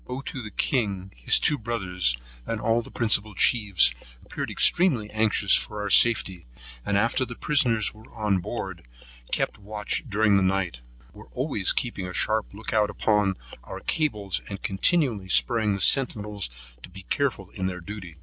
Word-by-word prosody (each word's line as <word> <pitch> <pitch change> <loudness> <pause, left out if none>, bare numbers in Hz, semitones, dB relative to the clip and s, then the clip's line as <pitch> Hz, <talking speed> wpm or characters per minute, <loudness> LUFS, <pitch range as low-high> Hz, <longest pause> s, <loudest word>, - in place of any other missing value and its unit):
Ottoo 130 +1 -5
the 110 - -7
king, 100 -7 -1
his - - +2
two 150 - +1
brothers, 90 - -1 0.3
and 115 - -2
all 115 +2 +1
the - - -12
principal 110 -3 +1
chiefs, 100 - +3 0.3
appeared - - -5
extremely 130 - +2
anxious 110 -2 +2
for 105 - -2
our 105 -1 -3
safety; 95 - +4 0.4
and 100 - 0
after 115 +5 +1
the 120 -2 -6
prisoners 120 -8 +1
were 110 +1 -17
on 105 -4 0
board, 85 - -6 0.4
kept - - -1
watch 105 +1 -3
during 105 -1 +3
the - - +2
night; 95 -8 -1 0.3
were 105 - -14
always 125 - +1
keeping 105 -7 -2
a 90 - -7
sharp 110 0 +1
look 105 +2 -6
out 105 -1 +2
upon 105 -1 +1 0.3
our - - -8
cables, 105 - -1
and 100 -1 -7
continually 110 - +1
spurring 110 -1 +3
the - - -5
centinels 105 - +1 0.3
to - - -11
be 95 +1 -12
careful 110 -4 -2
in 95 -1 -3
their 90 -1 -4
duty. 90 -2 -9
105 Hz, 165 wpm, -25 LUFS, 95-115 Hz, 0.4 s, safety